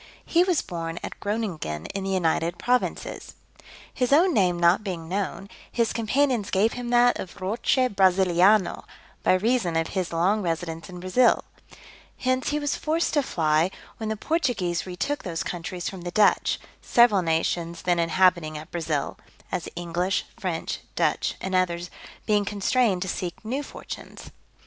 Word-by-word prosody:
He 345 Hz, +1 st, +4 dB
was 360 Hz, -4 st, +1 dB
born 165 Hz, -2 st, -5 dB
at -, -, -7 dB
Groninghen 185 Hz, -, -3 dB
in 195 Hz, -, -3 dB
the 195 Hz, -, -3 dB
United 170 Hz, -2 st, 0 dB
Provinces. 250 Hz, +5 st, -1 dB, 0.6 s
His 250 Hz, 0 st, 0 dB
own 340 Hz, +5 st, +5 dB
name 180 Hz, -6 st, +3 dB
not 175 Hz, +4 st, +4 dB
being 175 Hz, -5 st, -5 dB
known, 195 Hz, +1 st, -3 dB, 0.2 s
his 230 Hz, -2 st, +1 dB
companions 235 Hz, -1 st, +1 dB
gave 205 Hz, +4 st, +2 dB
him 245 Hz, -1 st, -5 dB
that 245 Hz, 0 st, +4 dB
of 190 Hz, +2 st, -7 dB
Roche 210 Hz, +8 st, 0 dB, 0.2 s
Brasiliano, 190 Hz, 0 st, +4 dB, 0.4 s
by -, -, +3 dB
reason 205 Hz, -3 st, +1 dB
of 165 Hz, 0 st, 0 dB
his 185 Hz, -3 st, -2 dB
long 185 Hz, +6 st, +2 dB
residence 165 Hz, -1 st, -3 dB
in 180 Hz, -1 st, -8 dB
Brasil: 210 Hz, +7 st, +3 dB, 0.7 s
hence 255 Hz, 0 st, 0 dB
he 295 Hz, -, 0 dB
was 290 Hz, -1 st, -1 dB
forced 320 Hz, +2 st, 0 dB
to 295 Hz, -, +4 dB
fly, 160 Hz, -, +1 dB, 0.3 s
when 220 Hz, -2 st, -4 dB
the 220 Hz, -, -2 dB
Portuguese 205 Hz, -, -1 dB
retook 195 Hz, +11 st, -2 dB
those 170 Hz, -3 st, -3 dB
countries 175 Hz, 0 st, -4 dB
from 190 Hz, -2 st, -6 dB
the 175 Hz, -, -4 dB
Dutch, 205 Hz, +3 st, +3 dB, 0.2 s
several 235 Hz, -5 st, +5 dB
nations 165 Hz, 0 st, -1 dB
then 175 Hz, -1 st, +2 dB
inhabiting 170 Hz, -2 st, +2 dB
at 155 Hz, +1 st, -10 dB
Brasil 160 Hz, -4 st, -2 dB, 0.3 s
(as -, -, -3 dB
English, 175 Hz, +2 st, -1 dB
French, -, -, -3 dB, 0.2 s
Dutch, -, -, +1 dB
and 190 Hz, -, -4 dB
others), 175 Hz, -1 st, 0 dB, 0.3 s
being 210 Hz, -1 st, +2 dB
constrained 205 Hz, 0 st, +1 dB
to -, -, -5 dB
seek 180 Hz, +2 st, -4 dB
new 260 Hz, +6 st, -2 dB
fortunes. -, -, -9 dB
190 Hz, 155 wpm, -25 LUFS, 170-230 Hz, 0.7 s, own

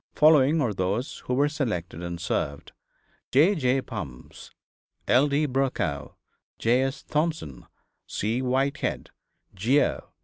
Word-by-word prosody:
Following 150 Hz, 0 st, +5 dB
are 120 Hz, -6 st, 0 dB
those 100 Hz, +8 st, -2 dB
who 125 Hz, -, 0 dB
were 140 Hz, +2 st, +3 dB
selected 105 Hz, -, -3 dB
and 85 Hz, 0 st, -5 dB
served: 70 Hz, -4 st, -3 dB, 0.6 s
J. 155 Hz, +10 st, +5 dB
J. 135 Hz, -6 st, +1 dB
Bumfs, 80 Hz, -, -8 dB, 0.6 s
L. 130 Hz, +4 st, +5 dB
D. 145 Hz, +2 st, +1 dB
Brokow, 130 Hz, -, -1 dB, 0.4 s
J. 125 Hz, +3 st, +2 dB
H. 135 Hz, +1 st, -5 dB
Thompson, 155 Hz, -, -2 dB, 0.4 s
C. 115 Hz, +5 st, -1 dB
Whitehead, 130 Hz, +2 st, -1 dB, 0.4 s
Geo. 120 Hz, +10 st, +1 dB
130 Hz, 115 wpm, -26 LUFS, 95-145 Hz, 0.6 s, Following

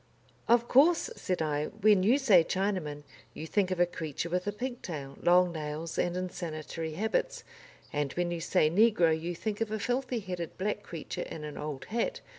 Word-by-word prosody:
"Of 235 Hz, 0 st, +4 dB
course," 325 Hz, -, +4 dB
said 180 Hz, -3 st, -2 dB
I, 150 Hz, -1 st, -1 dB
"when 210 Hz, -2 st, +3 dB
you 225 Hz, +8 st, +4 dB
say 215 Hz, -, +6 dB
Chinaman, 185 Hz, -7 st, -2 dB, 0.3 s
you 155 Hz, -, -6 dB
think 190 Hz, +3 st, +1 dB
of 185 Hz, -1 st, -2 dB
a 175 Hz, -, +6 dB
creature 165 Hz, -1 st, -4 dB
with 180 Hz, +2 st, -1 dB
a -, -, +1 dB
pigtail, 185 Hz, -, -5 dB
long 180 Hz, 0 st, +5 dB
nails, 155 Hz, 0 st, -4 dB
and 175 Hz, 0 st, 0 dB
insanitary 165 Hz, -3 st, -4 dB
habits, 220 Hz, -, -1 dB, 0.5 s
and 145 Hz, -2 st, -1 dB
when 175 Hz, 0 st, -1 dB
you 170 Hz, -1 st, -3 dB
say 175 Hz, -2 st, +3 dB
negro 200 Hz, -3 st, +4 dB
you 165 Hz, +2 st, -3 dB
think 210 Hz, +4 st, -4 dB
of 225 Hz, -, 0 dB
a 220 Hz, -, -2 dB
filthy 245 Hz, +2 st, -1 dB
headed, 180 Hz, -4 st, -5 dB
black 205 Hz, +2 st, -1 dB
creature 170 Hz, -6 st, -6 dB
in 155 Hz, -, -6 dB
an 150 Hz, -1 st, -6 dB
old 150 Hz, -2 st, -5 dB
hat. 230 Hz, +1 st, -2 dB
180 Hz, 185 wpm, -30 LUFS, 160-210 Hz, 0.5 s, say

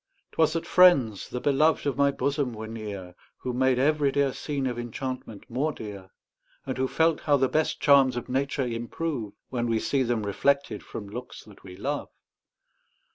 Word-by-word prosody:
'Twas 160 Hz, -1 st, +2 dB
that 165 Hz, 0 st, -2 dB
friends, 140 Hz, -, +4 dB
the 125 Hz, -, -3 dB
beloved 145 Hz, +5 st, +2 dB
of 140 Hz, -, 0 dB
my 140 Hz, 0 st, +4 dB
bosom, 140 Hz, -2 st, -1 dB
were 110 Hz, +1 st, -6 dB
near, 105 Hz, -5 st, -7 dB, 0.3 s
Who 125 Hz, -, -3 dB
made 130 Hz, 0 st, +2 dB
every 145 Hz, +1 st, +2 dB
dear 140 Hz, -1 st, +1 dB
scene 140 Hz, -3 st, -3 dB
of 120 Hz, -2 st, -2 dB
enchantment 120 Hz, -3 st, -6 dB
more 135 Hz, +6 st, -1 dB
dear, 100 Hz, -7 st, -8 dB, 0.6 s
And 130 Hz, -, -3 dB
who 130 Hz, -, +2 dB
felt 160 Hz, +3 st, +2 dB
how 145 Hz, -2 st, +3 dB
the 135 Hz, -1 st, +3 dB
best 155 Hz, +4 st, 0 dB
charms 135 Hz, -3 st, +5 dB
of 120 Hz, -, -4 dB
nature 135 Hz, +1 st, -1 dB
improve, 120 Hz, 0 st, -3 dB, 0.2 s
When 120 Hz, -2 st, -1 dB
we 115 Hz, -1 st, +1 dB
see 135 Hz, +4 st, 0 dB
them 120 Hz, -4 st, 0 dB
reflected 140 Hz, +7 st, 0 dB
from 105 Hz, -, -8 dB
looks 125 Hz, +5 st, -8 dB
that 105 Hz, -2 st, -17 dB
we 90 Hz, -1 st, -10 dB
love. 140 Hz, +8 st, -3 dB
130 Hz, 180 wpm, -27 LUFS, 115-140 Hz, 0.6 s, charms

